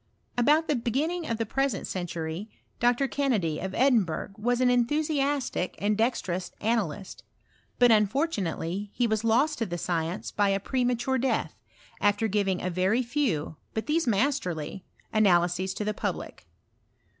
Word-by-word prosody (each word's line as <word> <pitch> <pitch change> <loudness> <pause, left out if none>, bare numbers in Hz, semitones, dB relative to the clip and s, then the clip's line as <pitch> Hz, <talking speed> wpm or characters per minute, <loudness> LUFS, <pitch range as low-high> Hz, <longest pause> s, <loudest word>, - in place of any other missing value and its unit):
About 300 +6 +3
the 295 - +2
begin 250 +6 0
ning 350 -2 -4
of 230 - 0
the 225 - -1
present 270 -1 -1
century, 175 +2 -4 0.3
Dr. 245 +3 +3
Kennedy, 225 - 0
of 190 +1 -4
Edin 250 -4 +4
burgh, 165 +3 -5
was 240 +3 0
an 250 -1 +4
enthusiastic 280 - 0
and 210 +1 +1
dexterous 190 -6 -1
analyst; 205 -5 -2 0.6
but 245 -1 +6
unfortunately 205 - 0
he 245 - +2
was 220 -1 0
lost 260 +7 +2
to 225 - -1
the 175 - -3
science 170 +1 -2
by 205 -1 +2
a 195 0 +1
premature 250 +3 0
death, 265 +1 0 0.5
after 205 +2 +2
giving 195 -3 0
a 180 - -1
very 190 +8 +2
few, 230 - -1 0.2
but 220 - -2
these 315 0 +1
masterly, 195 - 0 0.3
analyses 185 -3 +3
to 210 - -3
the 210 - 0
public. - - -5
220 Hz, 150 wpm, -27 LUFS, 185-255 Hz, 0.6 s, but